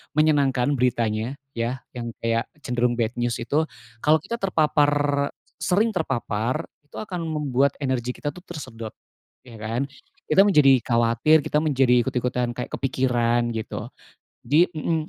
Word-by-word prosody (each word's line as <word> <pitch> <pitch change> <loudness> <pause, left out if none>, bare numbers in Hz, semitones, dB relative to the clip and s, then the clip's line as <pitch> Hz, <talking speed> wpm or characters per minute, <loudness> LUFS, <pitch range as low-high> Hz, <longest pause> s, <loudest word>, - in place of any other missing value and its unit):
menyenangkan 145 -4 +3
beritanya 115 0 0 0.2
ya, 120 +1 -3
yang 120 -2 -6
kayak 115 0 0 0.2
cenderung 125 0 0
bad 115 -1 0
news 120 0 0
itu, 155 +6 0 0.3
kalau 150 +5 +4
kita 235 0 -4
terpapar 145 -5 +2
e - - -10 0.3
sering 200 +8 +2
terpapar 125 - -1 0.2
itu - - -17
akan 190 -4 -5
membuat 140 -3 +1
energi 125 -2 -1
kita 145 - -3
tuh 180 - -14
tersedot, 120 -9 -8 0.5
ya 115 -3 -12
kan. 115 +4 -2 0.4
Kita 155 - +5
menjadi 150 - +5
khawatir, 120 +7 +3
kita 150 - +1
menjadi 130 -5 +3
ikut-ikutan 125 0 -1
kayak 125 - -5
kepikiran 120 -3 +1
gitu, 110 -1 -5 0.5
jadi 150 +8 +4
mhm, 155 0 -1
130 Hz, 140 wpm, -24 LUFS, 120-150 Hz, 0.5 s, Kita